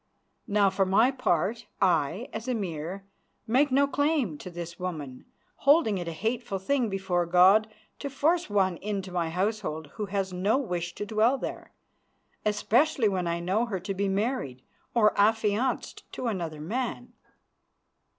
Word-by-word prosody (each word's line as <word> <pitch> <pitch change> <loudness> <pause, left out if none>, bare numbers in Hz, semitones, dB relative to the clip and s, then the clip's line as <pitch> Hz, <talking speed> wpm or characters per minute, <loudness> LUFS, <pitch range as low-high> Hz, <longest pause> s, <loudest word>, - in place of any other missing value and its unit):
Now 200 -2 +3
for 195 0 +2
my 200 +7 +4
part, 225 - 0
I, 180 - +1
as 220 +3 -5
Emir, 190 -5 -3 0.4
make 265 +5 +3
no 275 +2 +4
claim 285 - 0
to - - -8
this 170 -1 -7
woman, 155 -8 -5 0.3
holding 275 - +4
it 175 - -5
a - - -2
hateful 220 +4 -2
thing 235 +5 0
before 190 -3 -1
God 190 +5 +5 0.3
to 280 - -4
force 325 +4 +1
one 190 -4 +2
into 195 -1 -4
my 170 -2 -1
household 180 -5 -2
who 210 -2 -3
has 195 -1 -2
no 195 +7 +2
wish 175 -9 -3
to 205 - -4
dwell 220 +5 +2
there, - - -6 0.7
especially 220 +4 +2
when 185 -3 -1
I 170 0 -1
know 200 +7 0
her 195 -5 -3
to 195 +2 -3
be 200 +1 -1
married 195 - -2 0.3
or 215 -3 +4
affianced 220 +3 0
to - - -5
another 170 -9 -3
man. 245 +7 -4
200 Hz, 150 wpm, -28 LUFS, 180-235 Hz, 0.7 s, God